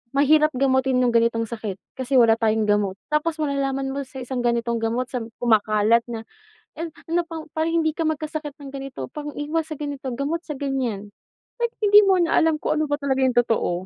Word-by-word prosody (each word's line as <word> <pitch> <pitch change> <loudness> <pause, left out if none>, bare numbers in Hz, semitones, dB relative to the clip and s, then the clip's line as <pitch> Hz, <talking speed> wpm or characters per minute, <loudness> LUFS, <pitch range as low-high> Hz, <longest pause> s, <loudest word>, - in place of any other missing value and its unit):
"Mahirap 305 +2 +5
gamutin 260 -1 +2
'yung 240 -1 +2
ganitong 230 0 +2
sakit, 215 -4 -5 0.2
kasi 260 +1 0
wala 230 -2 +6
tayong 220 -1 +1
gamot." 205 -2 +1 0.2
Tapos 320 +2 +1
malalaman 275 -2 -1
mo 280 - -2
sa 265 - -12
isang 245 0 -3
ganitong 235 -1 0
gamot 235 +3 0
sa 250 -2 -3 0.2
kumakalat 220 0 +3
na 225 -1 -5 0.5
e 330 - -3 0.2
ano 345 +1 +2
pang 320 -2 -8
para 315 0 -1
hindi 330 -1 +2
ka 325 +1 -3
magkasakit 310 -1 -3
ng 275 - -8
ganito 270 - -6
pang-iwas 300 +2 -3
sa 310 - -5
ganito 285 -1 -6
gamot 290 +6 -2
sa 300 - -4
ganyan. 255 -7 -3 0.5
Like 475 0 -1
hindi 415 +1 +8
mo 380 - +5
na 340 0 +3
alam 320 -1 +3
kung 305 +1 -1
ano - - +2
ba 290 - +1
talaga 270 -2 -1
'yung 255 -2 +2
totoo? 230 -6 +2
270 Hz, 195 wpm, -23 LUFS, 235-305 Hz, 0.5 s, hindi